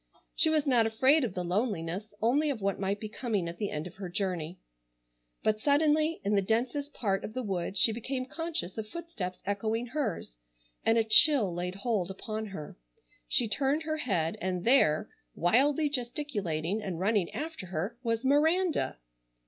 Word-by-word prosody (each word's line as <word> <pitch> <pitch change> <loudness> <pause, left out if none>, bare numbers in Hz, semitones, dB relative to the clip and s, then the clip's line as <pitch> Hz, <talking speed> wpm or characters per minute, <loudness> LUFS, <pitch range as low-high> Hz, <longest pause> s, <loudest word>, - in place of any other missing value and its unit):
She 320 - +4
was 310 -2 +2
not 240 -5 +3
afraid 265 +7 +4
of 220 -7 -3
the 180 - -2
loneliness, 190 0 -2
only 285 +7 +3
of 270 -5 -2
what 200 -1 -1
might 200 +1 -1
be 215 - -5
coming 210 -5 -2
at 170 +1 -7
the 205 - -1
end 150 +2 -4
of 180 - -10
her 190 -2 -6
journey. 180 -3 -2 0.9
But 215 0 +1
suddenly, 305 +4 +2
in 200 +2 0
the 200 - +4
densest 250 +8 -1
part 195 -4 -1
of 215 - -7
the 255 - -2
wood, 190 -2 -3
she 225 - +6
became 255 +3 -3
conscious 310 - -3
of 215 - -5
footsteps 270 - -6
echoing 220 +4 -1
hers, 225 - -4 0.4
and 225 +1 +3
a 225 - +4
chill 220 - +6
laid 180 +1 -3
hold 200 -3 -1
upon 215 +3 -5
her. 190 -7 -8 0.5
She 230 - +2
turned 275 +8 0
her 310 0 -2
head 180 - -1
and 180 -1 -2
there, 230 - +4 0.3
wildly 275 - +3
gesticulating 220 - -2
and 185 -5 -4
running 200 -1 +1
after 310 - -6
her, 185 +6 -3
was 230 -1 -1
Miranda! 315 +6 +2
220 Hz, 175 wpm, -30 LUFS, 190-275 Hz, 0.9 s, she